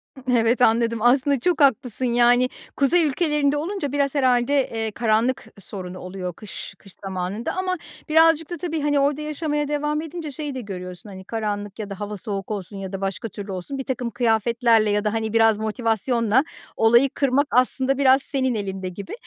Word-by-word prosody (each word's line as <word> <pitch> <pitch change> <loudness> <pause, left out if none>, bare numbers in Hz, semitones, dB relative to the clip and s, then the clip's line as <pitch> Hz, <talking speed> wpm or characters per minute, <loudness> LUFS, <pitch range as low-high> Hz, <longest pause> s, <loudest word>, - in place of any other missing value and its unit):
Hı. 265 - -12 0.2
Evet, 230 +2 +2
anladım. 230 -1 +3
Aslında 265 +2 +3
çok 350 +2 0
haklısın. 255 -2 +2
Yani, 245 +1 +4 0.3
kuzey 330 +5 +3
ülkelerinde 295 -1 +1
olunca 320 -3 -3
biraz 280 0 0
herhâlde, 255 0 +2 0.2
eee, 225 -1 -2
karanlık 230 +3 +1
sorun 185 -2 -7
oluyor 185 0 -6
kış 210 +3 -8
kış 195 -3 -13
zamanında 190 +4 -3
ama 370 0 0 0.3
birazcık 325 0 +4
da 345 - -4
tabii 320 -2 -3
hani, 290 -1 +2
orada 285 +2 +1
yaşamaya 300 -1 -2
devam 295 +1 -1
edince 320 -2 -6
şeyi 290 0 -5
de 255 - -4
görüyorsun. 180 -2 -8
Hani, 190 -1 -10
karanlık 205 -1 -4
ya 210 - -5
da 200 0 -7
hava 205 0 -5
soğuk 195 +1 -5
olsun 200 -1 -5
ya 190 -1 -6
da 195 - -4
başka 195 +3 -3
türlü 200 +1 -7
olsun, 190 +10 -5
birtakım 250 -2 -3
kıyafetlerle 230 0 +2
ya 205 0 +1
da 210 - 0
hani, 220 -1 -2
biraz 225 -2 +4
motivasyonla 225 +2 +1 0.3
olayı 235 +4 +5
kırmak 275 +1 +1
aslında 260 +2 +2
biraz 270 -1 +5
senin 260 -3 -1
elinde 190 -2 -4
gibi. 200 - -8
240 Hz, 180 wpm, -23 LUFS, 210-280 Hz, 0.3 s, olayı